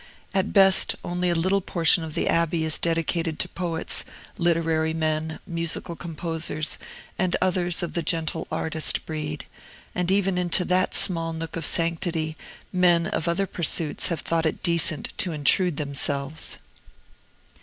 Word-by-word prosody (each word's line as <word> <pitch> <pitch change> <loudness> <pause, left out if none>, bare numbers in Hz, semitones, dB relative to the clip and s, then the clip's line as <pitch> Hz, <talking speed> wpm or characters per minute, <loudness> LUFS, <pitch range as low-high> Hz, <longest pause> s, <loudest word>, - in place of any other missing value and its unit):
At 195 0 0
best, 195 -2 +6
only 180 0 -1
a 170 - +1
little 185 +4 +1
portion 170 -1 +3
of 155 -1 -7
the - - 0
Abbey 165 -1 +1
is 160 - +1
dedicated 165 -1 -1
to - - -1
poets, 170 -3 0 0.3
literary 165 -2 +1
men, 155 0 -1
musical 170 0 -2
composers, 165 -2 -3 0.4
and 185 -1 +1
others 175 -2 +1
of 170 - -4
the 170 - 0
gentle 160 0 -2
artist 160 -1 0
breed, 150 -1 -5 0.5
and 180 0 -1
even 195 -1 +1
into 180 0 +1
that 185 0 +1
small 165 -2 +5
nook 160 0 -6
of 165 -3 -1
sanctity 165 -1 0 0.4
men 175 -2 +3
of 165 - -3
other 175 +4 +1
pursuits 165 -3 -1
have 170 - -2
thought 165 -1 0
it - - -4
decent 170 -2 +1
to 175 - +1
intrude 155 +3 +1
themselves. 140 +1 -3
165 Hz, 145 wpm, -24 LUFS, 160-175 Hz, 0.5 s, best